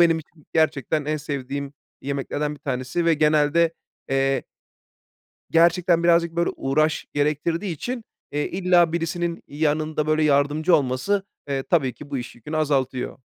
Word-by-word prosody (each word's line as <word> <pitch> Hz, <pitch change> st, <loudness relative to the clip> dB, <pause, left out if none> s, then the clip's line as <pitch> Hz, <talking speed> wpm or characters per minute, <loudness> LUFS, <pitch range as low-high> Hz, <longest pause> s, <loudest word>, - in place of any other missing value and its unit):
benim 165 Hz, -1 st, +5 dB
için 155 Hz, -1 st, -15 dB
gerçekten 155 Hz, -1 st, +1 dB
en 155 Hz, +1 st, -1 dB
sevdiğim 140 Hz, -1 st, -4 dB, 0.3 s
yemeklerden 140 Hz, +2 st, -2 dB
bir 145 Hz, -, -17 dB
tanesi 130 Hz, +4 st, -2 dB
ve 165 Hz, -1 st, +4 dB
genelde, 155 Hz, +2 st, +3 dB, 0.4 s
eee 135 Hz, 0 st, +1 dB, 1.1 s
Gerçekten 170 Hz, +1 st, +4 dB
birazcık, 170 Hz, -1 st, +3 dB
böyle, 170 Hz, 0 st, +2 dB
uğraş 155 Hz, +3 st, 0 dB
gerektirdiği 155 Hz, +6 st, 0 dB
için, 240 Hz, -, -5 dB, 0.3 s
eee, 145 Hz, +1 st, -1 dB
illa 180 Hz, -3 st, +3 dB
birisinin 170 Hz, 0 st, -2 dB
yanında, 155 Hz, +1 st, 0 dB
böyle, 155 Hz, 0 st, +2 dB
yardımcı 150 Hz, +4 st, +3 dB
olması, 150 Hz, +9 st, 0 dB, 0.2 s
eee, 135 Hz, -1 st, -1 dB
tabii 135 Hz, -5 st, +1 dB
ki 145 Hz, -1 st, -12 dB
bu 140 Hz, -, -1 dB
iş 125 Hz, 0 st, -7 dB
yükünü 150 Hz, +7 st, -6 dB
azaltıyor. 135 Hz, -5 st, 0 dB
155 Hz, 140 wpm, -23 LUFS, 140-170 Hz, 1.1 s, benim